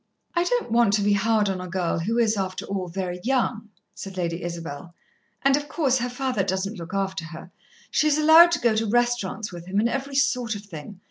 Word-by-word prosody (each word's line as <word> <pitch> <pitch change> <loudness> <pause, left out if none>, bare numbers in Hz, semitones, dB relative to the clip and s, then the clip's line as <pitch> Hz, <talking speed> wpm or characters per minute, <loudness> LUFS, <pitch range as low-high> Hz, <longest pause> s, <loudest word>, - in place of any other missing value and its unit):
"I 345 +1 +2
don't 485 - -1
want 230 -3 +4
to 205 -1 +2
be 205 0 +3
hard 210 +1 +2
on 190 -2 -2
a 185 - -6
girl 175 -2 -1
who 220 +8 -1
is, 225 -2 +3
after 190 -2 -3
all, 195 -2 -3
very 180 0 -4
young," 235 -4 0 0.2
said 195 -2 -9
Lady 170 -1 -2
Isabel. 170 -1 -7 0.5
"And, 275 0 +5
of 290 0 -3
course, 270 -6 +1
her 245 +1 -2
father 250 -3 -1
doesn't 190 +2 -2
look 170 +3 -7
after 190 -3 -2
her. 165 +2 -10 0.4
She 305 - +2
is 300 -1 +3
allowed 320 +3 +8
to 340 - +1
go 235 -3 +2
to 220 +1 0
restaurants 240 -3 0
with 175 0 -9
him 195 +2 0
and 225 - +3
every 270 +3 -3
sort 250 -5 +1
of 205 - -8
thing.... 180 +1 -10
205 Hz, 220 wpm, -24 LUFS, 185-245 Hz, 0.5 s, allowed